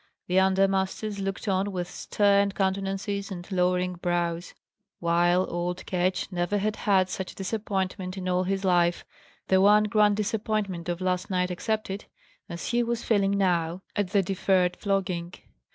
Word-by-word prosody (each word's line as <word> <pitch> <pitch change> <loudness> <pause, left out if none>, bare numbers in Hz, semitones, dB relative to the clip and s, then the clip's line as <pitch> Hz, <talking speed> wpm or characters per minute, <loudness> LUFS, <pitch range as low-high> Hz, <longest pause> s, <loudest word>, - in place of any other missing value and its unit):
The 180 +1 +2
under 190 +1 +4
masters 195 +2 -2
looked 195 +2 -4
on 195 +1 +1
with 180 -2 -3
stern 200 0 +2
countenances 195 +1 -1
and 175 -3 -6
lowering 180 0 +1
brows; 175 -1 -2 0.4
while 175 +2 +2
old 175 +1 -3
Ketch 180 +1 -1
never 175 +3 0
had 210 +1 -1
had 195 -4 +2
such 190 0 -5
a - - -17
disappointment 190 -2 -3
in 185 -1 -4
all 180 0 +1
his 195 +1 -1
life 175 -2 +2 0.4
(the 190 0 +4
one 210 +2 +6
grand 210 -1 +3
disappointment 210 -4 -2
of 175 +1 -3
last 185 -1 -1
night 180 -1 0
excepted) 205 +1 -3 0.4
as 170 - -5
he 240 0 +2
was 235 0 -2
feeling 200 -2 +2
now, 175 -2 0
at 205 -4 0
the 195 +1 +2
deferred 185 -1 +1
flogging. 180 -3 -2
190 Hz, 155 wpm, -27 LUFS, 180-200 Hz, 0.4 s, one